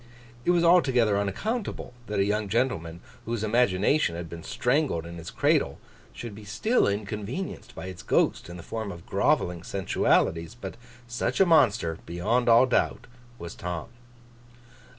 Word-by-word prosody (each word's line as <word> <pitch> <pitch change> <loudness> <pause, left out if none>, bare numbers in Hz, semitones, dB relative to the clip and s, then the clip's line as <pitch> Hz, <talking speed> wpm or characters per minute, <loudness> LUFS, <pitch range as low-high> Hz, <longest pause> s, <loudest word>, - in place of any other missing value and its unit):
It - - +1
was 175 -1 +4
altogether 130 - +4
unaccountable 125 - -3
that 105 - -3
a 100 - +3
young 105 0 -1
gentleman 90 -8 -1 0.2
whose 115 -1 -2
imagination 110 - +2
had 85 -1 -6
been 85 -1 -7
strangled 125 - 0
in 85 0 -8
his 85 0 -7
cradle, - - +1 0.3
should 115 -3 -8
be 105 +1 -11
still 120 - +1
inconvenienced 105 - -4
by - - -7
its 95 -2 -7
ghost - - +1
in 85 - -8
the 85 - -9
form 110 -1 -4
of 85 -2 -10
grovelling 90 -1 +1
sensualities; 85 0 +1
but 120 - -7 0.3
such 120 +1 -2
a 195 - +7
monster, 115 - +3
beyond 110 +9 0
all 115 +2 +7
doubt, 125 - 0 0.3
was 85 -5 -7
Tom. 90 -2 -5
105 Hz, 150 wpm, -27 LUFS, 90-125 Hz, 0.3 s, a